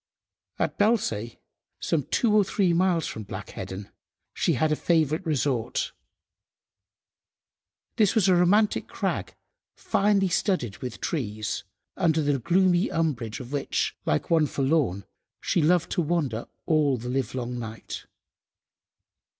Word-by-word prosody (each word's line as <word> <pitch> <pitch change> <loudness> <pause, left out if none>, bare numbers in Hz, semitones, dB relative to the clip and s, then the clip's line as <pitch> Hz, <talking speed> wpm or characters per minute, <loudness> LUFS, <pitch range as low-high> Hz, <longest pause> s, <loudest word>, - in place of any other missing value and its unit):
At - - -2
Belsay, 160 - +1 0.4
some 160 - 0
two 230 -4 +2
or 210 - +6
three 190 -2 +1
miles 175 -2 +2
from 110 - -5
Black 100 -2 -7
Heddon, 95 +1 -7 0.4
she - - +1
had 155 -1 +1
a - - +3
favourite 160 0 +1
resort. 135 -6 0 2.1
This 210 -4 +3
was 215 -5 +4
a 185 - +5
romantic 200 +5 +3
crag - - -3 0.4
finely 200 -1 +2
studded 170 - 0
with 125 -3 -6
trees, 110 -9 -3 0.3
under 160 -4 +2
the 145 -2 +1
gloomy 180 - +3
umbrage 130 -9 -1
of 125 -1 -9
which, 145 -1 -1
"like 75 - -1
one 160 -2 +4
forlorn," 135 - 0 0.3
she 175 - +1
loved 170 +2 +2
to 180 - +1
wander 145 -9 -1 0.2
all 150 -4 +2
the 120 +1 -7
live–long 125 -1 -2
night. 110 -1 -7
150 Hz, 125 wpm, -26 LUFS, 120-175 Hz, 2.1 s, or